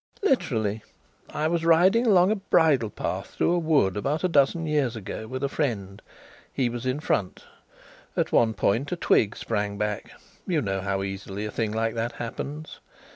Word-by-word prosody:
"Literally.... 110 - +1 0.5
I 155 - -1
was 165 0 0
riding 185 +8 +4
along 190 -2 +5
a - - +2
bridle 160 - +2
path - - -5
through - - +2
a 175 - +2
wood 150 - +2
about 140 - -1
a - - +4
dozen 165 +1 +2
years 145 -6 0
ago 110 +1 -6
with 130 +3 -5
a - - +2
friend. 105 -10 -3 0.5
He 125 -3 0
was 120 +1 -5
in 130 +3 0
front. 100 -11 -2 0.7
At - - 0
one 110 -1 +3
point 120 +8 0
a - - 0
twig 105 -10 +2
sprang 105 -2 -2
back 105 0 -3 0.4
you 175 -5 +1
know 100 -7 -2
how 95 0 -1
easily 95 +1 -5
a 105 - -4
thing 110 -1 -1
like 110 +1 -1
that 115 +1 -2
happens. 140 +7 -6
120 Hz, 180 wpm, -26 LUFS, 105-160 Hz, 0.7 s, along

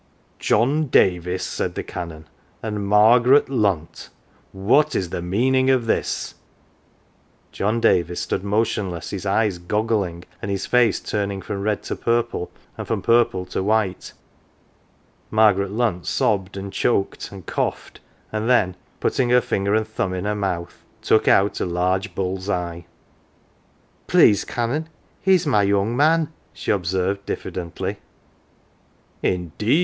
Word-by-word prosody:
" - - -38
John 145 +8 +3
Davis," 90 -5 +2
said - - -3
the - - -3
Canon, 80 -3 -7 0.2
" - - -36
and 105 -2 -3
Margaret 120 +7 +5
Lunt, 100 - -1 0.4
what 105 +10 +2
is 90 -2 -1
the - - -3
meaning 130 +9 +2
of 130 -3 +3
this? 115 - -1 0.6
" - - -37
John 110 +4 0
Davis 85 -5 +2
stood - - -2
motionless, 100 -4 -1
his 100 -1 -4
eyes 100 -2 +1
goggling, 100 -2 -1 0.2
and 100 - -4
his 100 -1 -2
face 125 -2 +3
turning 100 -2 -3
from 100 0 -5
red 105 0 -1
to - - -4
purple 115 -5 -1 0.3
and - - -5
from - - -2
purple 115 -6 +2
to - - -3
white. 105 -2 0 1.2
Margaret 105 -3 +3
Lunt 105 -6 -1
sobbed, 100 -2 0
and 95 0 -6
choked, 100 -5 -1
and 95 -3 -10
coughed, - - -3 0.3
and 110 +2 -2
then 95 -8 +3 0.2
putting 125 -2 0
her 125 0 +6
finger 100 -3 0
and 110 0 0
thumb 95 -4 -2
in 90 +1 -4
her 105 - 0
mouth 90 -4 -4 0.2
took 110 - +3
out 100 +1 +3
a - - +1
large 90 +4 -1
bull's 95 +1 -3
eye. 85 -3 -3 0.6
" - - -37
Please 100 - +5
Canon, 130 +7 -2 0.3
he's 185 -2 +3
my 130 -8 +3
young 100 +3 +1
man,'" 155 +3 +3 0.2
she - - -2
observed, 95 0 -1
diffidently. 85 -2 -4 0.7
" - - -37
Indeed 90 - 0
100 Hz, 145 wpm, -22 LUFS, 95-115 Hz, 1.2 s, her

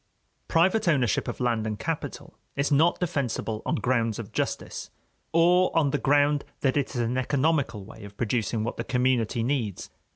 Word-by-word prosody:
Private 185 +5 +3
ownership 125 - +2
of - - -4
land 115 -3 0
and 105 -1 -3
capital - - -5 0.2
is 140 +2 0
not 160 +5 +4
defensible 135 -10 -2
on - - +1
grounds 115 -4 0
of - - -7
justice, - - -3 0.4
or 175 +2 +4
on 145 -4 +3
the 145 - 0
ground 145 +1 +3 0.2
that 135 -2 +2
it 145 -3 -1
is 120 - 0
an 120 +2 0
economical 140 -6 0
way 110 +1 -12
of 100 0 -11
producing 115 -1 -1
what 115 - -3
the 115 - -2
community 125 -3 +1
needs. 120 -7 -2
130 Hz, 170 wpm, -26 LUFS, 115-145 Hz, 0.4 s, not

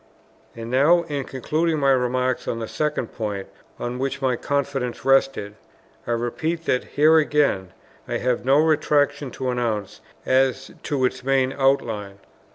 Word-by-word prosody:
And 115 0 -7
now 155 +7 +4
in 145 -5 -4
concluding 155 +5 -1
my 140 -2 +3
remarks 125 0 0
on - - -1
the 115 -1 -4
second 150 -4 -2
point 105 -3 -4 0.3
on 120 +1 -4
which 135 +1 -2
my 130 -2 +1
confidence 135 -2 -2
rested, 135 -6 +2 0.5
I - - -1
repeat 155 +8 -2
that 125 - +1
here 155 +2 +4
again 145 - +1 0.4
I - - -1
have 125 -1 -1
no 135 +3 +4
retractation 150 -2 +2
to 130 -1 -2
announce 115 -5 -3 0.2
as 130 -1 +1
to 140 -4 0
its 125 0 -2
main 135 0 +1
outline. 115 -8 0
130 Hz, 150 wpm, -23 LUFS, 120-145 Hz, 0.5 s, now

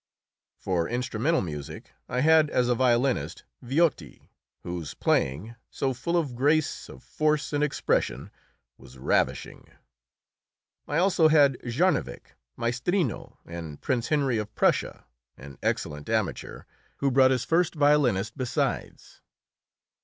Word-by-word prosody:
For 85 -3 -1
instrumental 125 +6 0
music 75 -5 -7 0.2
I 125 +1 -1
had 155 0 +5
as 125 -1 +1
a - - +4
violinist 120 - +1 0.2
Viotti, 130 - -1 0.3
whose 85 -3 -6
playing, 85 - 0
so 135 -1 -2
full 170 +8 -1
of 150 -7 -1
grace, 150 +5 0
of - - -13
force 150 -1 -1
and 145 0 +1
expression, 150 -2 -1 0.5
was 65 - -15
ravishing. 65 - -1 1.2
I 145 - -1
also 175 -2 +4
had 145 -4 +4
Jarnovick, 155 +10 -1 0.2
Maestrino, 125 - -2
and 85 -4 -8
Prince 125 -2 -1
Henry 140 -6 +1
of 105 0 -6
Prussia, - - 0 0.3
an 70 0 -12
excellent 75 0 -3
amateur, - - -2 0.3
who 140 -1 0
brought 130 0 +5
this 130 -2 0
first 170 +1 +1
violinist 135 -8 +2
besides. 130 -3 -3
125 Hz, 120 wpm, -26 LUFS, 105-150 Hz, 1.2 s, had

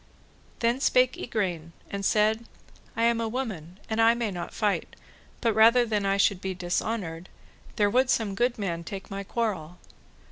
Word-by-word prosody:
Then 235 +2 +2
spake 255 -2 +3
Igraine 175 -8 -3 0.2
and 200 0 -4
said, 215 +3 +2 0.5
I 230 - +1
am 235 0 +3
a 225 - -1
woman 200 -8 -5
and 220 0 0
I 230 +1 +5
may 235 -3 -2
not 175 -2 -5
fight, 210 -2 -1 0.5
but 230 -2 +2
rather 230 +3 +6
than 210 -3 0
I 195 0 +2
should 200 -1 +2
be 190 -1 -3
dishonoured, 180 -1 -3 0.5
there 205 - +3
would 255 +5 +2
some 215 -5 +1
good 240 +4 0
man 170 -5 -3
take 195 +3 -8
my 195 0 -4
quarrel. 190 -7 -3
210 Hz, 170 wpm, -27 LUFS, 190-230 Hz, 0.5 s, rather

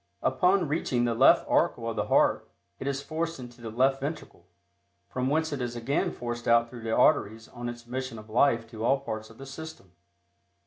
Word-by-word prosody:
Upon 180 -1 +3
reaching 135 -5 0
the 120 - +1
left 115 - +5
auricle - - +1
of - - -2
the - - -1
heart, - - +2 0.3
it 135 - -5
is 140 0 -2
forced 165 +2 -3
into 120 -1 -11
the 115 - -6
left 130 +4 +2
ventricle, 140 - -6 0.6
from 130 +1 -2
whence 160 +1 0
it 140 - -3
is 120 -1 -3
again 120 +4 0
forced 120 -1 -5
out 115 0 +4
through 120 -2 -9
the 110 0 -3
arteries 110 -7 +3
on 120 -1 -6
its 120 0 -9
mission 130 -1 -5
of 105 0 -11
life 115 0 +3
to 110 -1 -6
all 135 +3 +3
parts 110 -5 -5
of 115 - -16
the 135 - -9
system. 140 - -9
125 Hz, 205 wpm, -28 LUFS, 115-140 Hz, 0.6 s, left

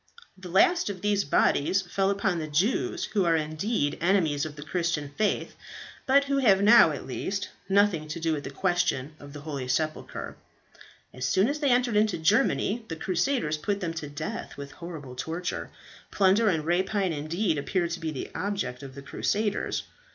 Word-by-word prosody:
The 185 -1 -10
last 340 - +4
of 190 -3 -6
these 205 -1 +2
bodies 150 +6 +2
fell 195 +2 0
upon 195 -3 0
the 155 - -4
Jews, 250 - 0
who 200 -3 +3
are 170 -1 +3
indeed 155 +1 -1
enemies 165 -5 +2
of 150 - -10
the 145 - -8
Christian 165 -2 -1
faith, 215 0 -1 0.5
but 275 +1 +5
who 280 0 0
have 200 -7 +4
now, 225 -4 +8
at 145 -3 -5
least, 195 +9 -3 0.2
nothing 195 -6 +3
to 155 +2 -5
do 165 -1 0
with 145 -2 -3
the - - -5
question 160 -3 0
of 145 0 -11
the 145 0 -9
holy 140 -4 -5
sepulchre. 155 +4 -3 0.8
As 125 0 -3
soon 190 +9 +3
as 290 +3 -2
they 290 -2 +1
entered 245 -2 +2
into 210 -1 +2
Germany 215 +5 +2
the 165 - -4
Crusaders 175 - 0
put 200 +6 -2
them 170 -4 -3
to 155 -3 -6
death 145 +2 -6
with 140 0 -7
horrible 160 -7 -9
torture. 165 +7 -4 0.4
Plunder 200 +3 +3
and 160 -5 0
rapine 185 +2 +1
indeed 155 +3 -1
appeared 170 +3 -1
to 170 - -3
be 165 -2 -3
the 145 -4 -5
object 195 -11 -3
of 135 -2 -10
the 140 - -9
crusaders. 210 +8 -1
175 Hz, 180 wpm, -27 LUFS, 150-205 Hz, 0.8 s, now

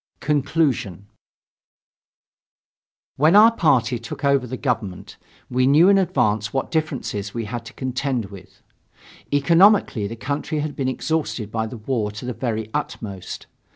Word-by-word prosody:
CONCLUSION 140 - 0 2.1
When 155 +6 +4
our 220 +2 +8
party 125 - +2
took 115 +4 -6
over 140 -2 +2
the 130 - -5
government, 110 -9 -3 0.3
we 130 +1 +1
knew 155 +7 +6
in 200 -1 +5
advance 110 - 0
what 135 - -2
difficulties 130 - -3
we 115 -1 -3
had 120 +2 -6
to - - -10
contend 130 -2 -2
with. 100 -2 -14 0.7
Economically 165 - +4
the 115 - -6
country 145 +5 -3
had 150 0 -4
been 130 -2 -1
exhausted 130 -7 -2
by 110 0 -2
the 120 - -8
war 110 -1 -2
to 110 +4 -8
the 125 - -3
very 110 -3 -3
utmost. 100 -5 -5
130 Hz, 140 wpm, -22 LUFS, 110-150 Hz, 2.1 s, our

